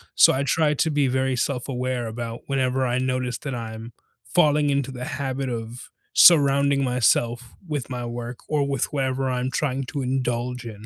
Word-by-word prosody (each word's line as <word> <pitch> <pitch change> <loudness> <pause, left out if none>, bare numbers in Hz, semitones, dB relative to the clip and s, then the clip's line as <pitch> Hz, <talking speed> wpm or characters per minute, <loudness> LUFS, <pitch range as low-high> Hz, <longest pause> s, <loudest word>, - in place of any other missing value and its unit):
So - - +7
I 130 - 0
tried 150 0 +1
to 160 - +2
be 145 -1 +2
very 130 0 0
self-aware 125 -1 -2
about 115 +1 -6
whenever 130 -1 0
I 120 - 0
noticed 130 -1 -2
that 140 -3 -4
I'm, 115 0 -7 0.3
falling 150 -4 +2
into 140 -1 -1
the 125 -1 -6
habit 135 -1 -3
of, 115 0 -6 0.2
surrounding 140 -3 +5
myself 120 -1 +1
with 145 -5 -3
my 125 -2 -4
work, 120 0 -6
or 145 -2 0
with 135 -3 0
whatever 135 -1 -1
I'm 125 +1 -2
trying 135 -2 -1
to 140 +2 -4
indulge 125 -1 -2
in. 110 -2 -9
130 Hz, 170 wpm, -24 LUFS, 120-140 Hz, 0.3 s, So